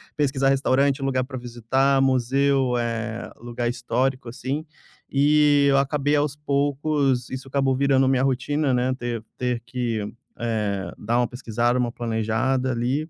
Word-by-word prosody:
pesquisar 135 -2 +1
restaurante, 135 0 +2
lugar 130 -1 0
pra 130 0 -7
visitar, 125 +3 +1
museu, 135 0 +2
eh, 115 -1 -3
lugar 120 0 -3
histórico, 125 +1 -1
assim, 135 +6 -4 0.5
e 145 0 +4
eu 135 - +4
acabei, 145 +1 +1
aos 145 -1 0
poucos 140 -2 0
isso 130 +1 -6
acabou 135 -1 +1
virando 135 0 +3
minha 130 -1 +2
rotina, 135 +2 0
né, 125 +1 +1
ter 120 -3 -4
ter 125 -2 -1
que, 120 -2 -2 0.4
eh, 105 -4 -2
dar 115 +3 -1
uma 120 - +2
pesquisada, 120 0 -1
uma 120 -1 0
planejada 120 +3 -1
ali. 130 +6 -1
130 Hz, 140 wpm, -24 LUFS, 120-140 Hz, 0.5 s, e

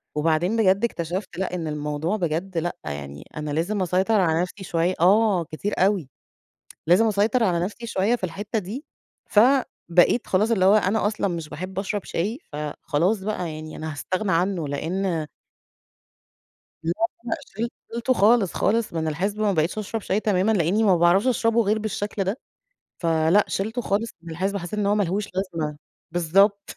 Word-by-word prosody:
وبعدين 165 +7 +1
بجد 200 0 +3
اكتشفت 180 -3 -3
لأ، 185 -1 -2
إن 165 -3 -3
الموضوع 150 +6 -2
بجد 175 +1 -2
لأ، 175 +2 -1
يعني 70 0 -6
أنا 150 -1 -3
لازم 180 +7 -1
أسيطر 190 +4 +2
على 165 -2 +2
نفسي 190 +2 -5
شوية 175 0 0
آه، 195 0 +4
كتير 180 +7 -4
أوي. 190 -7 +2 0.8
لازم 185 +7 +5
أسيطر 220 +3 +2
على 175 -3 +1
نفسي 235 +4 -6
شوية 215 +3 +1
في 190 - -6
الحتّة 205 +5 -3
دي، 215 - -6 0.5
فبقيت 225 -4 +3
خلاص 210 +5 +2
اللي 190 -5 +3
هو 195 +2 +6
أنا 210 +1 +2
أصلًا 210 -2 0
مش 165 -3 -4
باحب 185 +5 -6
أشرب 200 0 -2
شاي، 210 - -2
فخلاص 150 +6 -1
بقى. 185 -6 -3
يعني 155 0 -8
أنا 155 0 -5
هاستغنى 185 +8 -2
عنّه، 175 -3 0
لإن 165 +2 -2 1.6
بالضبط 210 +8 0 0.2
بقى. 235 - -1 0.2
شِل 230 +1 -1 0.2
شِلته 235 +2 +1
خالص، 210 -2 +4
خالص 220 -1 +1
من 160 -1 -1
الحِسبة 195 +7 -2
وما 205 - +3
بقيتش 160 +5 0
أشرب 215 +1 -3
شاي 195 +3 0
تمامًا، 210 0 +2
لإنّي 200 +3 +2
ما 190 -4 +5
باعرفش 175 +7 +4
أشربه 230 -1 +2
غير 215 +2 +1
بالشكل 210 -1 -2
ده 200 +8 -2 0.6
فلأ، 165 +4 +3
شِلته 225 +5 -2
خالص 210 +2 -1
من 170 - -9
الحِسبة، 195 +5 -1
حسّيت 175 +4 -5
إن 205 - +1
هو 205 - +3
ما 210 - +2
لهوش 200 +3 -1
لازمة. 165 -6 -3 0.3
بالضبط. 195 +4 +2
190 Hz, 170 wpm, -24 LUFS, 165-210 Hz, 1.6 s, هو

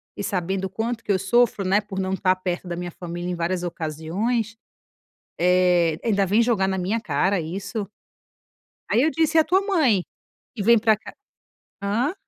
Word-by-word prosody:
e - - -5
sabendo 190 0 -2
o - - -4
quanto 225 +4 -3
que - - -1
eu 190 - +2
sofro, 215 +2 +2
né, 195 +2 +3
por 200 -2 -6
não 190 0 -1
estar 185 -1 +2
perto 180 -1 -4
da 175 - -3
minha 175 0 -5
família 175 0 -6
em 180 - -2
várias 175 +1 -2
ocasiões, 180 +8 -2 0.8
eh, 180 -2 +3
ainda 200 -4 +2
vem 205 +5 +3
jogar 225 -5 +1
na 190 0 -1
minha 190 +5 -1
cara 190 0 0
isso? 195 +5 -4 1.0
Aí 220 - +3
eu 315 - +3
disse: 320 +2 +2
"E - - +9
a - - +3
tua 375 +4 +3
mãe? 310 - +2 0.5
Que 220 - -4
vem 235 +3 +6
pra 220 0 +3
cá" 215 - -12 0.7
Hã? 230 - 0
195 Hz, 185 wpm, -23 LUFS, 180-225 Hz, 1.0 s, E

